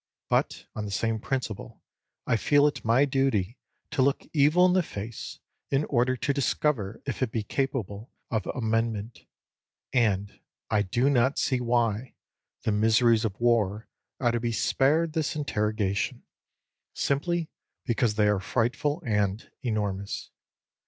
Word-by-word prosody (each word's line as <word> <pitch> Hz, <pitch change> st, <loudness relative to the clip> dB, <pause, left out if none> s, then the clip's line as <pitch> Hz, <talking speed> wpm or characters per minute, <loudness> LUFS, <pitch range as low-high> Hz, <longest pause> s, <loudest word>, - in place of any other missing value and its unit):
But, -, -, 0 dB
on 105 Hz, -, -3 dB
the -, -, -5 dB
same 110 Hz, +2 st, -1 dB
principle, 125 Hz, -4 st, -4 dB, 0.4 s
I -, -, +2 dB
feel 145 Hz, +6 st, +4 dB
it 150 Hz, -, 0 dB
my 120 Hz, +5 st, +4 dB
duty 135 Hz, -6 st, 0 dB, 0.3 s
to -, -, +1 dB
look 140 Hz, +1 st, +2 dB
evil 155 Hz, +4 st, +5 dB
in 180 Hz, -, +4 dB
the 185 Hz, -, +4 dB
face, 110 Hz, -, -7 dB, 0.3 s
in 140 Hz, +2 st, +1 dB
order 130 Hz, 0 st, +1 dB
to 140 Hz, +4 st, 0 dB
discover 130 Hz, -6 st, 0 dB
if 135 Hz, -, -4 dB
it 125 Hz, -4 st, 0 dB
be 110 Hz, -2 st, -1 dB
capable 115 Hz, -4 st, -3 dB, 0.2 s
of 110 Hz, -4 st, -1 dB
amendment; 115 Hz, -2 st, -2 dB, 0.7 s
and 100 Hz, -5 st, +1 dB, 0.3 s
I 105 Hz, -2 st, +3 dB
do 120 Hz, +7 st, +1 dB
not 135 Hz, 0 st, +3 dB
see 130 Hz, -2 st, +1 dB
why 120 Hz, 0 st, 0 dB, 0.5 s
the -, -, +1 dB
miseries 110 Hz, +2 st, +4 dB
of 105 Hz, -2 st, -3 dB
war 110 Hz, -3 st, +1 dB, 0.3 s
are 120 Hz, -2 st, +2 dB
to 120 Hz, -, 0 dB
be 120 Hz, 0 st, -1 dB
spared 150 Hz, +7 st, +2 dB
this 155 Hz, -2 st, -1 dB
interrogation, 105 Hz, -8 st, -1 dB, 0.7 s
simply 165 Hz, +4 st, 0 dB, 0.3 s
because 120 Hz, -3 st, +1 dB
they 105 Hz, -1 st, +3 dB
are 105 Hz, -1 st, +2 dB
frightful 125 Hz, +8 st, -1 dB
and 105 Hz, -2 st, 0 dB
enormous. 105 Hz, -4 st, -3 dB
115 Hz, 140 wpm, -27 LUFS, 105-135 Hz, 0.7 s, evil